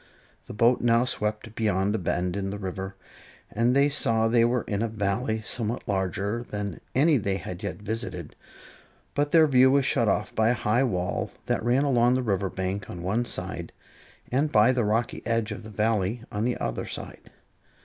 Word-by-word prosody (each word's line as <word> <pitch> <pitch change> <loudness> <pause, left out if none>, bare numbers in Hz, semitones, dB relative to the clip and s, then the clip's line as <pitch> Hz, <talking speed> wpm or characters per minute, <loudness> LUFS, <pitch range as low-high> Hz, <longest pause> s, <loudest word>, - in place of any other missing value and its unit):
The - - -8
boat 120 +2 +3
now 120 0 +3
swept 105 -3 -1
around 100 -1 +1
a 110 - 0
bend 90 +1 -1
in 100 -1 -2
the 100 - -4
river, 95 0 -5 0.6
and 115 +4 +2
they 140 +1 +5
saw 115 -6 +2
they 115 0 +4
were 120 0 +1
in 100 0 -2
a 115 - +1
Valley 110 +1 -1
somewhat 115 +1 -3
larger 100 +3 -1
than 105 -6 -5
any 150 +3 +4
they 100 -4 -1
had 90 -2 -7
yet - - -3
visited; 110 -6 -4 0.8
but 145 +1 0
their 160 +1 +6
view 130 -3 +5
was 140 0 +3
shut 120 -4 +2
off 100 +1 0
by 110 0 +2
a 125 - +2
high 120 +3 +1
wall 90 -8 -1 0.2
that - - -1
ran 125 +4 +2
along 125 -3 +3
the 130 - 0
river 100 -3 0
bank 95 +1 -4
on 85 -1 -7
one 110 +7 0
side, - - -4 0.6
and 145 +4 +1
by 110 -1 +5
the 125 -2 +1
rocky 110 +3 0
edge 115 -1 0
of 105 - -5
the 110 - -10
Valley 110 +1 0
on 105 +2 -1
the 125 - 0
other - - -3
side. - - -7
110 Hz, 190 wpm, -26 LUFS, 100-120 Hz, 0.8 s, their